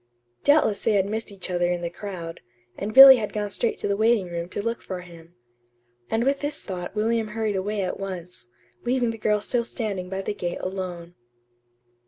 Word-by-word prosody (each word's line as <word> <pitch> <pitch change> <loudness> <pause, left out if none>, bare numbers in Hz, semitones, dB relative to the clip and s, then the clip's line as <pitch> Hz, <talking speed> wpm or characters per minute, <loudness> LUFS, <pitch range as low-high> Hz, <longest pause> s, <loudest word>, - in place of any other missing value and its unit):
Doubtless 285 -9 +3
they 220 - +2
had 195 -2 +3
missed 215 +1 -4
each 190 -2 -7
other 175 0 +1
in 175 -1 -2
the 170 - -2
crowd, 175 -3 -7 0.3
and 205 +2 -4
Billy 265 +2 +11
had 210 -3 -3
gone 210 -1 -2
straight 235 - -1
to - - -3
the 200 - +1
waiting 220 -4 +2
room 170 0 -4
to - - -5
look 230 +3 -2
for 185 -1 -6
him. 170 -1 -15 0.7
And 225 +1 +1
with 275 +2 +1
this 290 +1 -3
thought 180 0 -6
William 225 +1 +1
hurried 215 -1 -2
away 200 +1 -1
at 185 - -3
once, 180 -8 -7 0.4
leaving 245 -1 +1
the 225 - -9
girl 210 -1 +2
still 240 +2 0
standing 200 -6 -4
by 195 +1 -4
the 205 - -2
gate 175 -4 -4
alone. 180 -2 -5
200 Hz, 200 wpm, -25 LUFS, 180-225 Hz, 0.7 s, Billy